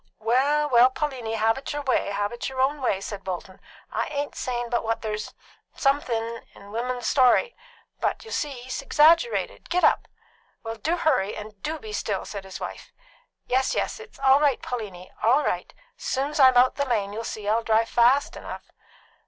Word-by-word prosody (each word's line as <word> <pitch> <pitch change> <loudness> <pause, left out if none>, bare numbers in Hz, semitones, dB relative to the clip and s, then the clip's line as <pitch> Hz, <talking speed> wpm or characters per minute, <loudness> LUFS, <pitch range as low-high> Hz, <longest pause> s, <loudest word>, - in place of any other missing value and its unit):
"Well, 270 +7 +2
well, 250 -2 +6
Pauliny, 260 -5 -3
have 225 +3 +2
it 270 - -6
your 290 - -3
own - - -13
way, 260 - +1
have 205 +1 -1
it 240 - -4
your 265 -1 -7
own 275 +2 +1
way," 195 -6 0
said 200 0 -6
Bolton. 185 0 -6 0.3
"I - - -1
ain't 285 -1 -3
sayin' 240 -1 -3
but 240 - +1
what 225 +1 -2
there's 215 -1 -4 0.4
_some_thin' 235 -5 0
in 200 0 -13
William's 245 +2 -3
story; 265 - +4 0.4
but - - -1
you'll 450 - -8
see't 275 -5 -3
he's 260 +2 -4
exaggerated. 330 - +3
Git 360 +1 +1
up!" - - +4 0.6
"Well, 225 0 -5
do 320 +11 -1
hurry, 210 - +1
and 210 -1 -9
do 315 +7 -3
be 220 -7 -9
still!" 205 -2 -2
said 200 -2 -7
his 190 - -8
wife. - - -7 0.5
"Yes, 260 +1 +1
yes. - - -1
It's 450 0 -13
all 270 0 +5
right, 285 -4 +2
Pauliny; 200 -7 -6
all 260 +7 +4
right. - - -2 0.3
Soon's 285 +3 -2
I'm 260 -2 +7
out 250 +1 +5
the 280 - +1
lane, 210 -6 -1
you'll 225 +2 -4
see't 215 -2 -6
I'll 220 +2 +2
drive 225 0 +2
fast 245 +5 +3
enough." - - -9
245 Hz, 190 wpm, -25 LUFS, 220-280 Hz, 0.6 s, I'm